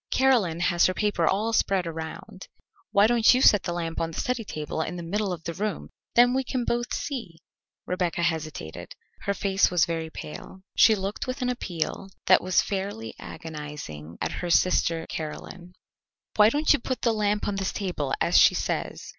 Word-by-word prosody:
Caroline 230 -11 +2
has 175 -1 +3
her 185 - -2
paper 205 -6 +1
all 215 +4 +1
spread 195 -4 +2
around. 165 +5 -7 0.4
Why 200 +1 +5
don't 235 +1 +5
you - - +3
set 205 -6 +6
the - - -3
lamp 165 -1 -3
on 165 - -1
the 165 - -6
study 250 -2 -1
table 155 -4 -4
in 175 - -3
the 175 - -6
middle 200 +3 -1
of 170 -2 -5
the 170 - -4
room, 205 +3 -3 0.3
then 245 +1 +6
we 265 +1 +1
can 255 0 -2
both 240 +1 -1
see?" 230 - -4 0.5
Rebecca 180 -1 -1
hesitated. 155 - -4 0.3
Her 200 - 0
face 195 -1 +2
was 175 -3 +3
very 165 -1 -3
pale. 160 +4 -9
She 220 - +6
looked 195 +4 -4
with 255 +1 -3
an 250 - 0
appeal 190 -5 -3 0.2
that 185 - +6
was 185 0 +2
fairly 190 - -4
agonizing 150 - -8
at - - -1
her 175 - -3
sister 165 -2 +2
Caroline. 175 +3 -7 0.6
"Why 210 0 +7
don't 295 +5 +3
you 295 - +1
put 255 +2 -4
the 230 - +3
lamp 210 -1 0
on 205 -1 -2
this 195 -1 -1
table, 175 -9 -3
as - - +4
she - - +6
says?" - - -3
185 Hz, 190 wpm, -26 LUFS, 165-215 Hz, 0.6 s, Why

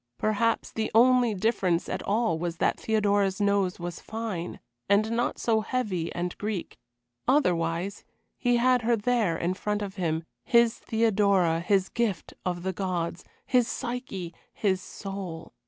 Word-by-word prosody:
Perhaps 220 +2 +1
the 220 -1 -2
only 245 -1 +5
difference 185 -4 +1
at - - -3
all 205 -6 +1
was 170 0 -3
that - - +1
Theodora's 205 -3 +1
nose 200 -3 +1
was 175 -1 -5
fine, 215 -6 -5 0.3
and 210 +2 +3
not 235 +1 0
so 225 -2 +2
heavy 210 -8 -2
and 175 0 -2
Greek; 205 -4 -4 0.5
otherwise 180 - +1 0.3
he 245 -1 +2
had 250 +1 +4
her 235 +1 +3
there 220 -6 +1
in 175 +3 0
front 210 +2 -2
of 195 -1 -7
him 165 -3 -1 0.2
his 235 -2 +4
Theodora, 200 -7 +2
his 190 +1 +2
gift 225 -7 -2
of 175 -2 -2
the 190 0 -1
gods, 180 -2 -2 0.2
his 250 -2 +3
Psyche, 240 -9 -4 0.2
his 190 -3 0
soul. 195 -5 -7
200 Hz, 145 wpm, -27 LUFS, 180-230 Hz, 0.5 s, only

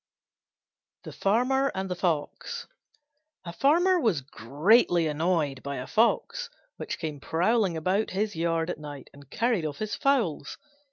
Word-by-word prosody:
THE - - -8
FARMER 255 +7 +1
AND 190 0 -2
THE 180 - -3
FOX 165 -5 -2 0.8
A 170 - -6
Farmer 350 - +3
was 215 - +1
greatly 160 - +2
annoyed 155 -3 0
by 140 0 -5
a 125 - -5
Fox, 360 - +1 0.3
which - - -5
came 155 -3 -5
prowling 180 - +1
about 185 +7 0
his 205 +2 -2
yard 165 +1 0
at - - -7
night 145 -2 -9
and 140 -1 -16
carried 230 - 0
off 150 -2 -4
his 215 -1 -4
fowls. 225 - 0
175 Hz, 145 wpm, -27 LUFS, 150-225 Hz, 0.8 s, Farmer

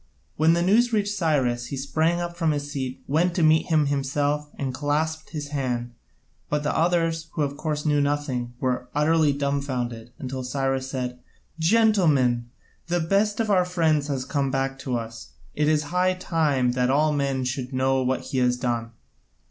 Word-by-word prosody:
When 160 +2 +4
the 170 0 +1
news 230 +6 +4
reached 205 -2 0
Cyrus, 130 -9 0
he 140 - -5
sprang 160 +5 0
up 175 0 -4
from 165 -2 0
his 145 0 -4
seat, 130 -2 -4
went 170 +4 +1
to 170 - +2
meet 155 0 +4
him 155 -2 +3
himself, 145 +1 -1
and 135 -2 -3
clasped 155 +3 -1
his 150 -3 -5
hand, 125 -4 -2 0.6
but 150 0 0
the 150 - -1
others, 165 -1 +1
who 155 - 0
of 140 0 -2
course 150 0 -3
knew 145 -1 +3
nothing, 140 -4 -1
were 125 -1 -1
utterly 155 0 +3
dumbfounded, 135 -5 -2
until 130 -4 -5
Cyrus 135 0 -1
said: 125 -2 -4 0.4
"Gentlemen, 160 - +3 0.4
the 175 +1 +1
best 200 +6 +1
of 220 -2 +1
our 185 -2 +4
friends 160 -5 +1
has 135 -3 -2
come 140 -1 -1
back 135 0 -2
to 125 -3 -2
us. 115 - -8 0.2
It 150 0 +1
is 155 -1 +2
high 185 +1 +2
time 150 -8 +1
that 125 0 +1
all 150 +3 +3
men 140 -2 0
should 125 0 -3
know 130 0 +1
what 130 0 0
he 130 - -3
has 125 0 +2
done. 120 -2 -2
145 Hz, 180 wpm, -25 LUFS, 130-160 Hz, 0.6 s, When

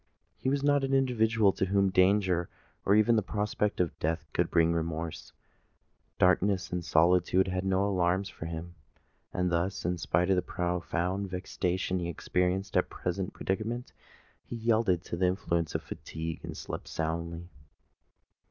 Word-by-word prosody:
He 130 - -2
was 140 0 0
not 145 -1 +3
an 135 0 +1
individual 115 -5 +3
to - - 0
whom 100 0 +2
danger 95 -2 +3 0.4
or 100 - +5
even 110 +2 +5
the - - +3
prospect 105 +1 -1
of 90 -3 -1
death 80 -1 -1
could 85 -1 +1
bring 85 0 +3
remorse: 80 -1 -3 0.9
darkness 95 +1 +2
and 90 -1 -2
solitude 90 +3 +3
had 95 0 -2
no 95 +1 +2
alarms 95 0 +1
for 80 -3 -7
him;—and, 85 +2 -6
thus, 85 +2 -1
in 90 0 0
spite 90 +4 +1
of - - +5
the - - +3
profound 90 +2 -2
vexation 90 0 -2
he 85 -1 -3
experienced 90 +3 -1
at - - +4
his - - -33
present 90 +1 -3
predicament, 115 +6 -3 0.5
he - - -7
yielded 110 -6 +2
to - - -4
the 90 +1 +3
influence 85 -3 -1
of - - -1
fatigue 80 0 -6
and - - -7
slept - - -6
soundly. 85 +1 -3
90 Hz, 155 wpm, -30 LUFS, 85-100 Hz, 0.9 s, or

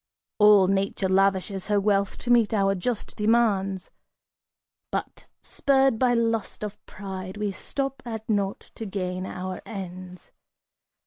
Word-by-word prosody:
All 210 -2 +7
Nature 195 0 0
lavishes 195 0 +1
her 205 -1 +3
wealth 200 -1 +1
to 245 - -2
meet 230 -3 +4
our 195 -1 +3
just 210 +4 -3
demands; 210 -4 +1 1.0
But, - - -4 0.2
spurred 270 -4 +2
by 250 -2 +3
lust 230 -3 -1
of 210 0 -6
pride, 190 -1 -7
we 210 -1 -1
stop 270 +7 -4
at 225 -3 -6
naught 200 -2 -1
to 225 - -6
gain 185 -1 -3
our 185 0 -5
ends! 185 -3 -8
200 Hz, 130 wpm, -26 LUFS, 190-225 Hz, 1.0 s, All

